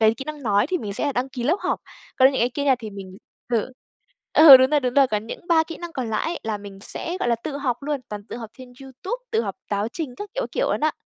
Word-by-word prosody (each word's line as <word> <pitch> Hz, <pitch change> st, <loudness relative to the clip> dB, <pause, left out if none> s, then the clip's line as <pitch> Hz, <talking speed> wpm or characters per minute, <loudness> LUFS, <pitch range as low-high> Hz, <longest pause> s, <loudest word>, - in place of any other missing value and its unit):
cái 220 Hz, 0 st, +5 dB
kỹ 270 Hz, -, -7 dB
năng 300 Hz, -2 st, -7 dB
nói 205 Hz, +1 st, +2 dB
thì 365 Hz, 0 st, 0 dB
mình 205 Hz, -6 st, -5 dB
sẽ 285 Hz, +6 st, -1 dB
đăng 255 Hz, +1 st, -1 dB
ký 250 Hz, -2 st, -6 dB
lớp 325 Hz, +9 st, +3 dB
học, -, -, -1 dB, 0.4 s
còn 260 Hz, 0 st, +6 dB
những -, -, -1 dB
cái 240 Hz, +2 st, +2 dB
kia 280 Hz, +1 st, +2 dB
thì 220 Hz, -2 st, -7 dB
mình 195 Hz, -2 st, -9 dB, 0.3 s
thử, 235 Hz, +2 st, 0 dB, 0.6 s
ừ, 300 Hz, -4 st, +11 dB
đúng 260 Hz, +2 st, +3 dB
rồi, 295 Hz, -, +3 dB
đúng 250 Hz, -2 st, -2 dB
rồi, 275 Hz, -1 st, +6 dB
còn 215 Hz, -2 st, -2 dB
những -, -, -7 dB
3 325 Hz, -1 st, +5 dB
kỹ 330 Hz, -, -8 dB
năng 345 Hz, -1 st, -8 dB
còn 250 Hz, -5 st, -3 dB
lại 215 Hz, -, -1 dB
á, -, -, -5 dB
là 220 Hz, -2 st, -3 dB
mình 200 Hz, -1 st, -11 dB
sẽ, 345 Hz, -, -5 dB
gọi 240 Hz, -, 0 dB
là, 235 Hz, -, +4 dB
tự 275 Hz, +5 st, -6 dB
học 255 Hz, -4 st, -1 dB
luôn, 290 Hz, -1 st, -2 dB
toàn 210 Hz, -1 st, -6 dB
tự -, -, -6 dB
học 225 Hz, -3 st, -8 dB
trên 255 Hz, -1 st, -12 dB
YouTube, 270 Hz, -, -6 dB
tự 450 Hz, -, +2 dB
học -, -, -5 dB
táo 205 Hz, +2 st, -1 dB
trình 285 Hz, -2 st, -5 dB
các 410 Hz, -1 st, -7 dB
kiểu, -, -, -1 dB
các -, -, -6 dB
kiểu -, -, 0 dB
luôn -, -, -2 dB
á. 310 Hz, 0 st, +2 dB
260 Hz, 295 wpm, -23 LUFS, 220-295 Hz, 0.6 s, ừ